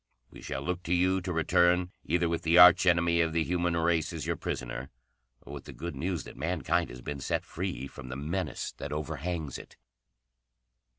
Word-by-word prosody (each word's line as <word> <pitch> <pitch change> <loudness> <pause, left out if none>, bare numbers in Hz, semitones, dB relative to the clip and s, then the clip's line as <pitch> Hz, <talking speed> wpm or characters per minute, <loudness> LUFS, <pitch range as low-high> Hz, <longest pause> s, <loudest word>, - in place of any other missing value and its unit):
"We - - -12
shall 65 +1 -4
look 90 +4 -2
to 90 - +1
you 95 +2 +2
to 90 0 -4
return, 90 +2 +3
either 85 +2 +1
with 85 0 -1
the 80 +1 +3
arch 90 +1 +8
enemy 85 -1 +4
of 80 -1 0
the 80 0 +2
human 85 0 0
race 85 -1 +1
as - - -5
your - - 0
prisoner, 65 +1 -5 0.5
or 70 - -10
with 70 -2 -8
the - - -9
good 85 -1 -6
news 85 +4 -2
that - - -11
mankind 85 +1 0
has 60 +1 -9
been 75 -1 -5
set 65 - -2
free 65 - -4
from 65 -2 -10
the 65 - -5
menace 75 +1 -3
that - - -6
overhangs 75 0 -4
it. - - -14
85 Hz, 195 wpm, -29 LUFS, 75-90 Hz, 0.5 s, arch